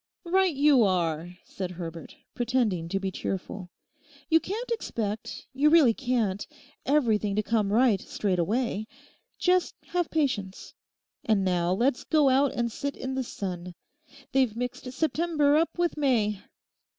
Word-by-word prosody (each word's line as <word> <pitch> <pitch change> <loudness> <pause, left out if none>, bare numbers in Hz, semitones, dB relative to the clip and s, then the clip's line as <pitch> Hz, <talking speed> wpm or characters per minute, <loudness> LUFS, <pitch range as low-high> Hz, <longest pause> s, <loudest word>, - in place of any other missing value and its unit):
'Right 370 -1 +2
you 280 -2 +5
are,' 175 -3 0
said 185 -2 -5
Herbert, 170 -2 -8 0.2
pretending 230 -9 0
to 195 - -1
be 195 -1 -3
cheerful. 190 0 -5 0.6
'You 325 - +6
can't 450 +8 -5
expect, 220 - -3
you 285 +3 +4
really 305 -8 +6
can't, 235 -6 -1 0.4
everything 220 -8 +2
to 215 - +1
come 210 -2 0
right 225 -3 +3
straight 190 -4 -2
away. 220 +3 -1 0.5
Just 365 0 +2
have 350 -2 0
patience. 225 -12 -2 0.5
And 205 -4 +2
now, 175 -1 +1
let's 245 +6 +1
go 300 -4 +3
out 270 +1 +3
and 235 -1 -1
sit 280 +4 -4
in 260 +1 -4
the 265 0 -1
sun. 180 -6 -6 0.6
They've 255 -5 +2
mixed 250 +1 -4
September 310 0 +1
up 325 +3 +1
with 345 -1 +1
May. 225 -9 +1
235 Hz, 140 wpm, -27 LUFS, 195-285 Hz, 0.6 s, You